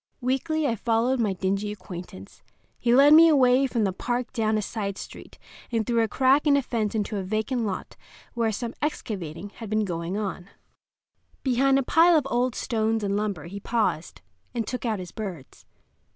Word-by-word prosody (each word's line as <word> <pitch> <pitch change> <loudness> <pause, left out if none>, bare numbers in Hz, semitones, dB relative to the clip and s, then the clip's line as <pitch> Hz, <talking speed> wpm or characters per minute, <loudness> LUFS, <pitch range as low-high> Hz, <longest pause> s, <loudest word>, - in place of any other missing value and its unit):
Weakly 280 +5 -1
I 235 -5 +1
followed 230 +4 +1
my 210 -4 +1
dingy 195 +3 -1
acquaintance. 180 - -10 0.4
He 240 0 +3
led 285 +3 +7
me 330 +2 +9
away 265 -2 +4
from 235 -4 -1
the 195 -2 0
park 240 +5 -3
down 220 -1 +1
a - - 0
side 200 -2 -4
street - - -10 0.3
and 225 -2 0
through 235 0 +1
a 225 - +2
crack 270 +6 +3
in 285 -1 +5
a 280 - 0
fence 225 -4 -2
into 210 0 -2
a 195 - -2
vacant 220 +5 -1
lot 195 - -5 0.4
where 230 -2 0
some 230 +3 -4
excavating 195 - -4
had 220 +1 -10
been 215 0 +1
going 170 +1 -3
on. 195 -3 -4 0.9
Behind 270 +1 +3
a 275 - +1
pile 330 +5 +5
of 300 - 0
old 245 +1 +1
stones 225 -1 -1
and 200 0 0
lumber 200 -7 -2
he 195 +4 -7
paused, 210 -7 -2 0.3
and 230 -2 -1
took 250 +2 -4
out 220 -2 0
his 180 -2 -8
birds. 185 -11 -8
225 Hz, 185 wpm, -25 LUFS, 200-250 Hz, 0.9 s, me